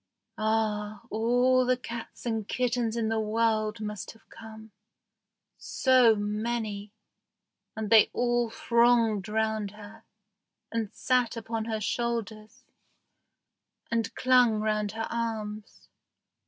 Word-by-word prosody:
Ah! 215 -1 -1
all 245 +3 +3
the 255 0 +2
cats 235 -1 -8
and 225 -3 -2
kittens 240 -2 -1
in 220 -1 0
the 225 0 0
world 220 0 0
must 210 -2 -5
have 225 - -24
come. 220 -1 -12 0.9
So 255 -4 +4
many! 210 0 -3 0.8
And 220 -1 -4
they 220 -2 +7
all 240 -1 +1
thronged 235 -4 +2
round 220 -1 -1
her, 215 +2 -13 0.7
and 225 -3 -2
sat 250 -2 0
upon 225 0 -4
her 220 -1 -2
shoulders, 230 +1 -3 1.3
and 230 -1 0
clung 250 -3 +4
round 215 -1 -1
her 225 0 -3
arms. 220 -2 -5
225 Hz, 110 wpm, -28 LUFS, 215-235 Hz, 1.3 s, they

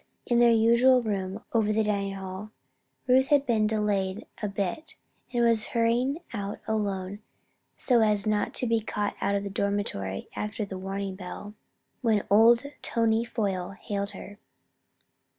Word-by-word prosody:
's - - -22
in 240 - +4
their 240 0 +6
usual 235 +3 +5
room 200 -1 -3
over 220 -2 +2
the 220 +1 +2
dining 200 -2 -1
hall, 190 +2 -7 0.6
Ruth 260 0 +4
had 285 -1 +3
been 220 -4 +2
delayed 210 -2 -1 0.2
a 210 - -1
bit 200 - -4 0.4
and 240 -1 +2
was 230 -2 +3
hurrying 240 +5 +2 0.2
out 200 -2 -4
alone 200 -2 -2 0.6
so 245 -3 +3
as 210 -2 +3
not 210 -1 0
to - - +3
be 230 -1 +2
caught 210 -1 -3
out 200 0 +1
of 200 - -1
the 200 - -4
dormitory 200 - -2
after 210 0 -3
warning 195 +1 -4
bell, 200 +2 -8 0.5
when 220 -5 +2
old 230 +4 +6 0.2
Tony 230 -1 +1
Foyle 195 -5 -3
hailed 200 -1 -3
her. 205 +1 -11
210 Hz, 150 wpm, -27 LUFS, 200-230 Hz, 0.6 s, their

